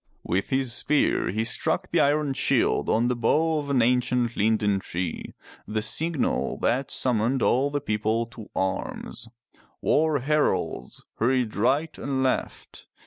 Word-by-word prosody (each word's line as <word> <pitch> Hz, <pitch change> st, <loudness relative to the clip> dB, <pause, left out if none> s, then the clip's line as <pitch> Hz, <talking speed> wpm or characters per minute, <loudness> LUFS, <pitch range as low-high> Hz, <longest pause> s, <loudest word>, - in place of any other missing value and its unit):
With 95 Hz, +3 st, -1 dB
his 130 Hz, -3 st, +1 dB
spear 145 Hz, +4 st, +1 dB
he 110 Hz, +4 st, -1 dB
struck 115 Hz, -, 0 dB
the -, -, +2 dB
iron 145 Hz, 0 st, +2 dB
shield -, -, +1 dB
on 115 Hz, +2 st, +2 dB
the 125 Hz, -, 0 dB
bough 155 Hz, +7 st, +1 dB
of 145 Hz, -1 st, -6 dB
an 130 Hz, -4 st, +3 dB
ancient 125 Hz, -1 st, +1 dB
linden 105 Hz, -2 st, +1 dB
tree, 90 Hz, -2 st, -5 dB, 0.3 s
the 105 Hz, +1 st, -2 dB
signal 155 Hz, +7 st, -1 dB
that 130 Hz, +3 st, +1 dB
summoned 125 Hz, +1 st, +1 dB
all 135 Hz, +4 st, +2 dB
the 145 Hz, 0 st, -2 dB
people 110 Hz, -1 st, -1 dB
to 110 Hz, -3 st, -11 dB
arms. 95 Hz, +4 st, -3 dB, 0.5 s
War 155 Hz, -1 st, +2 dB
heralds 150 Hz, +3 st, -1 dB, 0.2 s
hurried 125 Hz, -1 st, +1 dB
right 135 Hz, +9 st, +1 dB
and 135 Hz, -1 st, -1 dB
left. 130 Hz, -, -3 dB
125 Hz, 140 wpm, -25 LUFS, 110-140 Hz, 0.5 s, an